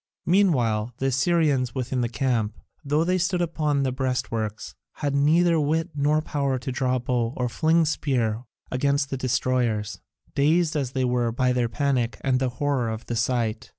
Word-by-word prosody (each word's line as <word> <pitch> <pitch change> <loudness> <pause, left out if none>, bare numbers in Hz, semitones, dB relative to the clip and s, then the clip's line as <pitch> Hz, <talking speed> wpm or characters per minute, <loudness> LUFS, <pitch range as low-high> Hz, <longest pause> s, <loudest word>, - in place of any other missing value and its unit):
Meanwhile 125 - +2
the 135 - -3
Assyrians 135 -2 +1
within 130 0 -1
the 120 - 0
camp, 120 -4 -1 0.3
though 150 +2 +1
they 185 +2 +1
stood 180 +1 0
upon 155 -4 0
the 130 - 0
breastworks, 125 -5 -3 0.2
had 145 -2 -2
neither 165 +4 +3
wit 160 +3 0
nor 150 +1 +1
power 140 -4 -1
to 130 +2 -5
draw 130 0 0
bow 125 -1 -1
or 125 - 0
fling 160 +6 +2
spear 125 -7 -1 0.3
against 140 +2 0
the - - 0
destroyers, 120 -5 0 0.3
dazed 160 +3 +2
as 135 -4 -2
they 130 -2 0
were 125 -1 +1
by 125 +2 +1
their 120 -2 0
panic 125 -2 0
and 130 -1 +1
the 130 -1 0
horror 140 -5 0
of 110 +1 -5
the 120 - -3
sight. 115 -1 -1
130 Hz, 170 wpm, -25 LUFS, 120-150 Hz, 0.3 s, neither